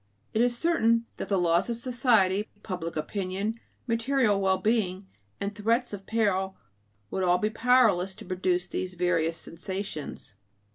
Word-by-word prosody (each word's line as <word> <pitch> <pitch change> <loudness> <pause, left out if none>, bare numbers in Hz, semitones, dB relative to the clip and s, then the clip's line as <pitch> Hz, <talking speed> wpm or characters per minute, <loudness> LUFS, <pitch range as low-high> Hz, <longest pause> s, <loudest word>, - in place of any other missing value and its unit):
It 220 - +2
is 240 0 +3
certain 230 -8 +2
that - - -5
the 200 - +2
laws 170 +3 +2
of 235 - -2
society, 225 -5 +2
public 175 -4 -4
opinion, 195 +7 -3 0.3
material 230 -3 +2
well 190 -1 +3
being, 200 -4 0 0.3
and 200 +1 -2
threats 230 +3 0
of 195 -1 -7
peril 195 -4 0 0.5
would 190 - -1
all 180 -1 +4
be 215 +3 0
powerless 220 -6 +3
to - - -11
produce 180 -1 0
these 185 0 -4
various 165 -2 +1
sensations. 170 - -6
200 Hz, 145 wpm, -28 LUFS, 185-230 Hz, 0.5 s, all